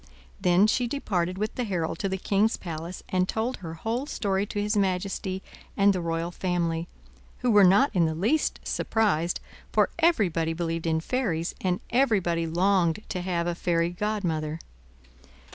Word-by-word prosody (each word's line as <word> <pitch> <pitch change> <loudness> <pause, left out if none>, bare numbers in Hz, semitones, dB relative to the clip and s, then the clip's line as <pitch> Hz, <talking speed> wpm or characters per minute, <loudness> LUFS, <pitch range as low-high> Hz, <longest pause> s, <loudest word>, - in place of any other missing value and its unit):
Then 180 +1 +5
she 240 +3 +1
departed 185 -9 -1
with 215 +2 -2
the 250 - -2
herald 180 -7 -2
to 195 - -1
the 190 - -1
king's 205 +4 +1
palace, 170 +1 -6
and 185 0 +1
told 230 +4 -1
her 165 -3 -7
whole 230 - -2
story 200 -6 -1
to 205 - -3
his 210 +1 0
majesty 190 -1 -1 0.3
and 200 0 +5
the 185 - -2
royal 165 0 -2
family, 170 -2 -1 0.5
who 250 -1 +2
were 205 -2 +7
not 200 +10 +5
in 170 -4 +3
the 160 - -2
least 225 - +1
surprised, 175 -7 0 0.3
for - - +3
everybody 185 - +2
believed 165 0 -2
in 160 0 +1
fairies, 175 -7 -1
and 180 -1 0
everybody 195 -10 +2
longed 180 +1 +2
to 180 - -3
have 175 -2 -1
a 175 - 0
fairy 170 -1 +1
godmother. 175 -6 -2
185 Hz, 160 wpm, -27 LUFS, 170-210 Hz, 0.5 s, were